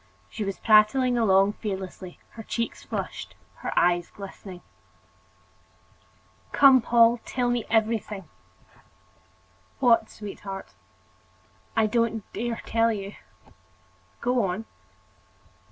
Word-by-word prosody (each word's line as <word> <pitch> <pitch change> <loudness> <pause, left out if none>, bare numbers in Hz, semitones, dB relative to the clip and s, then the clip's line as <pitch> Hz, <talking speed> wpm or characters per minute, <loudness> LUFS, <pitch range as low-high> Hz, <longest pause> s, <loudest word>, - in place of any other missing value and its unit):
She 220 - -4
was 195 -1 -3
prattling 230 +4 +4
along 200 -3 +4
fearlessly, 190 -3 -6
her 225 - -9
cheeks 230 +1 -3
flushed, - - -5 0.2
her - - -5
eyes 175 0 +3
glistening. 190 -2 -10 1.9
"Come, 270 -2 +7
Paul; 235 0 +4
tell 245 -1 -1
me 240 -2 -1
everything." 220 -3 0 1.5
"What, 235 -4 +3
sweetheart?" 195 - -8 1.0
"I 220 - +4
don't 225 0 0
dare 235 0 -3
tell 230 0 +2
you." 200 -2 -5 1.1
"Go 245 -1 +1
on!" 195 +4 -2
220 Hz, 95 wpm, -26 LUFS, 195-235 Hz, 1.9 s, Come